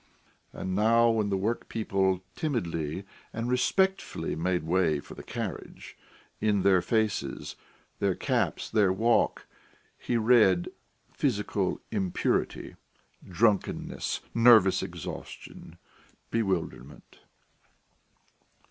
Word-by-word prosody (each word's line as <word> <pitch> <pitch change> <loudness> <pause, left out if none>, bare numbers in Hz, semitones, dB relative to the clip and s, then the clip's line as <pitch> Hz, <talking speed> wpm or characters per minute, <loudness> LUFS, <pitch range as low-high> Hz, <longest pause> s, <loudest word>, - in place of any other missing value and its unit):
And 95 - -5
now 115 +3 +4
when 110 -2 0
the 100 - 0
workpeople 95 -3 -1
timidly 90 - -3 0.3
and 115 +1 -4
respectfully 190 +10 0
made 90 +1 -1
way 80 -2 +1
for - - -11
the - - -9
carriage, - - -7 0.4
in 105 -3 +1
their 95 -2 +4
faces, 105 - -1 0.4
their - - +1
caps, - - -1
their 105 -4 +3
walk, 115 +5 +1 0.5
he 120 - -1
read 110 -6 +4 0.4
physical 105 -7 -1
impurity, 95 -5 -1 0.6
drunkenness, 105 +2 0
nervous 115 -5 +6
exhaustion, 90 -4 -8 0.5
bewilderment. 95 - -3
100 Hz, 90 wpm, -28 LUFS, 90-115 Hz, 0.6 s, nervous